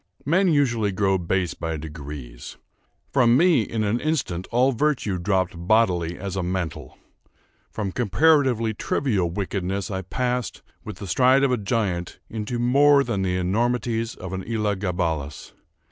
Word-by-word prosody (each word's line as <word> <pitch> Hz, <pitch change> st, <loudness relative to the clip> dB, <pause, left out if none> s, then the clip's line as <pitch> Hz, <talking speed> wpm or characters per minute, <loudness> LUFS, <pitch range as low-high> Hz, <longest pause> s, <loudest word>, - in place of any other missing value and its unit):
Men 185 Hz, +7 st, +3 dB
usually 120 Hz, -, +2 dB
grow 95 Hz, -1 st, +1 dB
base 90 Hz, 0 st, -1 dB
by 80 Hz, -1 st, -4 dB
degrees. 75 Hz, -5 st, -9 dB, 0.6 s
From 120 Hz, -2 st, +5 dB
me, 170 Hz, -4 st, +4 dB
in 110 Hz, 0 st, -2 dB
an 105 Hz, +3 st, 0 dB
instant, 125 Hz, -, -2 dB
all 125 Hz, +3 st, +3 dB
virtue 120 Hz, -7 st, 0 dB
dropped 95 Hz, 0 st, 0 dB
bodily 90 Hz, -2 st, +1 dB
as 95 Hz, 0 st, -5 dB
a 95 Hz, -, -1 dB
mantle. 90 Hz, -1 st, -4 dB, 0.7 s
From 100 Hz, -3 st, -4 dB
comparatively 125 Hz, -, +2 dB
trivial 105 Hz, -5 st, 0 dB
wickedness 95 Hz, +1 st, -3 dB
I 95 Hz, -1 st, -2 dB
passed, 125 Hz, +4 st, -3 dB, 0.2 s
with -, -, -8 dB
the -, -, -7 dB
stride 130 Hz, +8 st, +4 dB
of 135 Hz, -, +3 dB
a 125 Hz, -, +2 dB
giant, 100 Hz, -5 st, -2 dB
into 110 Hz, +2 st, -3 dB
more 140 Hz, +4 st, +4 dB
than 100 Hz, -7 st, -2 dB
the 90 Hz, -1 st, 0 dB
enormities 115 Hz, +4 st, -1 dB
of 95 Hz, 0 st, -7 dB
an 95 Hz, 0 st, -4 dB
Elah 105 Hz, -2 st, 0 dB
Gabalus. 85 Hz, -7 st, -3 dB
105 Hz, 145 wpm, -24 LUFS, 90-125 Hz, 0.7 s, From